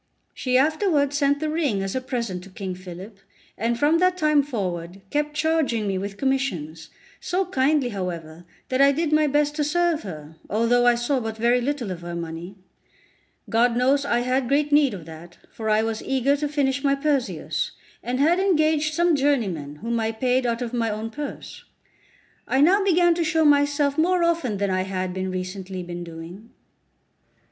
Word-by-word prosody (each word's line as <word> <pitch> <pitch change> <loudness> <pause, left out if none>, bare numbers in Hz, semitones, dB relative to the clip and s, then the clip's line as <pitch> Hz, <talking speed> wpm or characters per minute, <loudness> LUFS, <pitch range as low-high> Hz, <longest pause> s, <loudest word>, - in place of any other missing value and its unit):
She 255 -1 0
afterwards 300 0 +2
sent 285 0 +2
the 310 0 -2
ring 285 -12 0
as 195 +3 -4
a 260 - -1
present 235 -8 -4
to - - -13
King 190 -1 -5
Philip, 185 +3 -10 0.4
and 230 +2 -1
from 300 +6 +3
that 365 0 +2
time 305 -3 +3
forward 190 -8 -4
kept 295 0 -1
charging 300 -8 +1
me 195 -2 -1
with 200 +1 -5
commissions, 185 - -2 0.3
so 375 +2 -1
kindly, 280 -5 +1
however, 175 -5 -5 0.3
that 255 +1 +1
I 280 0 +7
did 310 +2 -1
my 305 0 +4
best 295 +1 +1
to 300 - +1
serve 340 +1 +1
her, 160 -4 -9
although 230 +4 +2
I 240 - +5
saw 240 +3 0
but 225 -2 -5
very 240 +2 +2
little 255 -5 -2
of 175 -2 -6
her 175 0 -6
money. 170 +3 -6 0.9
God 235 +1 +2
knows 270 +3 +3
I 240 -4 +1
had 255 +1 0
great 290 +3 +1
need 290 -6 +4
of 170 -5 -10
that, 165 +2 -12
for 220 -1 -4
I 215 +1 +3
was 225 -1 -2
eager 270 +1 +1
to 295 +1 -1
finish 280 -2 0
my 275 -1 +3
Perseus, 275 -3 -1 0.3
and 250 +1 -3
had 330 +6 +3
engaged 310 -5 +2
some 345 -1 +3
journeymen, 210 - 0
whom 230 0 -1
I 225 0 -1
paid 250 +2 +1
out 235 +1 -1
of 240 0 -6
my 230 -2 0
own 220 +1 -4
purse. 290 +3 -7 0.8
I 265 - +1
now 375 +8 +5
began 350 -2 +4
to 335 0 -1
show 320 0 +2
myself 285 0 +3
more 355 +2 +3
often 330 -11 0
than 200 -1 -1
I 185 0 +1
had 185 -1 -3
recently 185 0 -4
been 175 0 -6
doing. 170 +6 -10
250 Hz, 185 wpm, -24 LUFS, 195-295 Hz, 0.9 s, I